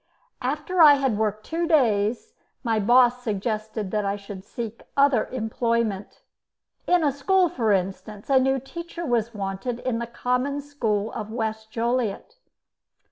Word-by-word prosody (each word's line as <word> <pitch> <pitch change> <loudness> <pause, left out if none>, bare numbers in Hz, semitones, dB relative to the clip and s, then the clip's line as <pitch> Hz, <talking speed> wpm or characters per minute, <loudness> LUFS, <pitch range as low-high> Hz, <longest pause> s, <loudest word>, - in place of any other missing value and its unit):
After 300 +7 0
I 295 -2 +9
had 270 -5 0
worked 215 0 -1
two 335 +1 -2
days 230 -8 +2 0.3
my 225 -3 +1
boss 245 +3 +4
suggested 215 -2 -3
that 210 -1 0
I 200 0 -1
should 200 -2 -9
seek 230 +1 -6 0.2
other 280 -5 +4
employment 230 -3 -2 0.7
in 355 -2 +3
a 290 - +3
school, 360 +6 +2
for 235 -10 0
instance; 195 +2 -2
a 270 -1 +5
new 265 +1 +2
teacher 340 +5 -7
was 235 -3 0
wanted 200 +4 -3
in 240 -3 -1
the 235 - -4
common 250 +4 -1
school 225 -7 -2
of 215 -2 -5
West 220 -1 -3
Joliet. 235 - -2
235 Hz, 145 wpm, -24 LUFS, 215-275 Hz, 0.7 s, I